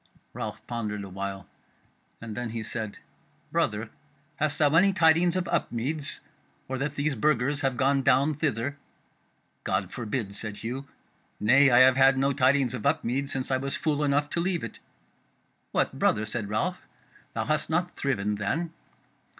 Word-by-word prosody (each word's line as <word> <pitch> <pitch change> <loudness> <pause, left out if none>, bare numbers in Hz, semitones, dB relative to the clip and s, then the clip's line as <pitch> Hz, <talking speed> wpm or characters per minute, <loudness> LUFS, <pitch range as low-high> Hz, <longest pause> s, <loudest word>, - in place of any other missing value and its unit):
Ralph - - -6
pondered 105 -4 -3
a 100 - -8
while, 95 0 -5 0.8
and 115 -2 -6
then 120 0 -3
he 115 0 -4
said: 110 -2 -3 0.5
"Brother, 110 +2 0 0.5
hast 150 -1 0
thou 145 -1 +3
any 190 +4 +5
tidings 170 0 +4
of 185 -1 -1
Upmeads, 140 +5 -2 0.5
or 130 0 -3
that 145 +1 -2
these 145 +1 0
Burgers 135 +3 +1
have 135 -2 0
gone 135 +1 +3
down 135 +4 +3
thither?" 140 -2 -2 0.9
"God 95 -1 -1
forbid!" 110 -3 -3
said 105 0 -6
Hugh. 130 +5 -5 0.5
"Nay, 135 +6 +6
I 120 0 +6
have 130 0 +6
had 135 0 +6
no 135 +1 +2
tidings 130 -1 +3
of 125 - -5
Upmeads 140 -1 0
since 135 0 -2
I 130 - +3
was 135 +1 -2
fool 150 -2 0
enough 145 0 +2
to - - -1
leave 175 0 0
it." - - -7 0.9
"What! - - 0
brother," 110 - +2
said 105 -1 -4
Ralph, 105 +1 -2 0.5
"thou - - -1
hast 155 0 +1
not 175 +3 0
thriven 105 -7 -1
then?" 160 +12 -2
135 Hz, 160 wpm, -27 LUFS, 115-145 Hz, 0.9 s, Nay